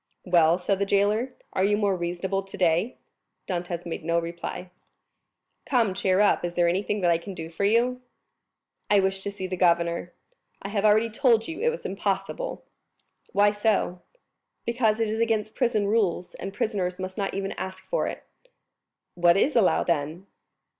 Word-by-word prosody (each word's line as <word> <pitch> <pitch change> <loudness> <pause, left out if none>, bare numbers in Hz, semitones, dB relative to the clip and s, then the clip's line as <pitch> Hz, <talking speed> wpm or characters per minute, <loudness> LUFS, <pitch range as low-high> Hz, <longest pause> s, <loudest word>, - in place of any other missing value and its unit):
"Well," 170 -2 +4
said 190 +1 -1
the 200 - +1
jailer, 210 +6 +1 0.2
"are 190 - +1
you 205 +1 +3
more 200 -2 +1
reasonable 180 +2 -2
today?" 190 +2 0 0.5
Dantès 175 -1 -3
made 165 -1 -5
no 170 +1 +1
reply. 170 +2 -5 1.0
"Come, 235 -7 +2
cheer 185 0 +1
up; 210 - +3
is 175 0 -3
there 175 -1 +3
anything 200 +4 0
that 175 -1 +3
I 165 - +2
can 190 +2 -8
do 165 -1 -7
for 200 +4 -1
you?" 240 +4 +2 0.9
"I 205 - +5
wish 190 0 0
to 200 - -3
see 200 -2 -6
the 185 0 -4
governor." 170 0 +2 0.5
"I 195 - -6
have 205 0 0
already 215 +2 +4
told 230 -2 +3
you 325 - -6
it 475 - +3
was 480 +1 -5
impossible." 195 - -3 0.7
"Why 205 +1 +5
so?" 205 -4 0 0.6
"Because 230 -2 +1
it 225 - +1
is 220 +1 -2
against 220 -2 0
prison 235 -5 +1
rules, 200 -4 0
and 195 - -6
prisoners 190 -3 -2
must 185 0 -5
not 195 -3 -2
even 195 0 -2
ask 190 0 -6
for - - -1
it." - - -6 0.9
"What 175 0 +4
is 280 +9 +2
allowed, 220 -6 +3
then?" 165 +2 -1
195 Hz, 170 wpm, -26 LUFS, 175-215 Hz, 1.0 s, I